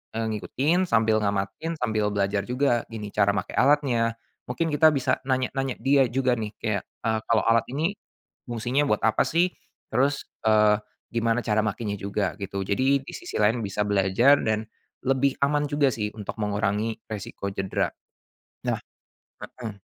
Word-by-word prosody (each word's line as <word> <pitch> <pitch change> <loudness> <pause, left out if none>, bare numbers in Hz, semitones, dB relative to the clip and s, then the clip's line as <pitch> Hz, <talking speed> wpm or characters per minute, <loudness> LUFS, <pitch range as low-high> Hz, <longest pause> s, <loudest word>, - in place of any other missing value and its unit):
eee, 115 - -1
ngikutin 155 - 0
sambil 110 -3 +3
ngamatin 100 +11 -2
sambil 110 -3 +1
belajar 100 0 0
juga 125 -2 +1
gini 105 -2 -6
cara 100 -1 +3
make - - -3
alatnya, 125 -5 +3 0.3
mungkin 160 +6 -1
kita 155 +2 +6
bisa 135 - +1
nanya-nanya 130 0 0
dia 135 -1 +4
juga 130 +1 +1
nih 105 -1 -3
kayak, 100 -3 -1 0.2
eee, 110 -1 +1
kalau 115 -2 +3
alat 115 0 +4
ini, 160 +7 +1 0.6
fungsinya 120 +5 0
buat 105 - 0
apa 110 - +3
sih? 175 +2 +2 0.4
Terus, 135 +4 +1 0.2
eee, 105 -1 +5 0.4
gimana 115 +1 +1
cara 110 -1 +2
makenya 105 0 -2
juga 100 0 -1
gitu 100 0 -3
jadi 130 +7 +2
di - - -9
sisi 355 - -8
lain 110 +3 +3
bisa 105 0 -1
belajar 100 +8 +4
dan, 110 0 0 0.4
lebih 135 +1 +2
aman 145 +1 +2
juga 145 -2 +2
sih 105 -2 -2
untuk 105 +1 -6
mengurangi 105 +2 0 0.2
resiko 100 -1 -5
cedera 95 -1 -1 0.7
nah, - - 0 0.8
heeh. 105 -4 -6
115 Hz, 155 wpm, -25 LUFS, 105-135 Hz, 0.8 s, kita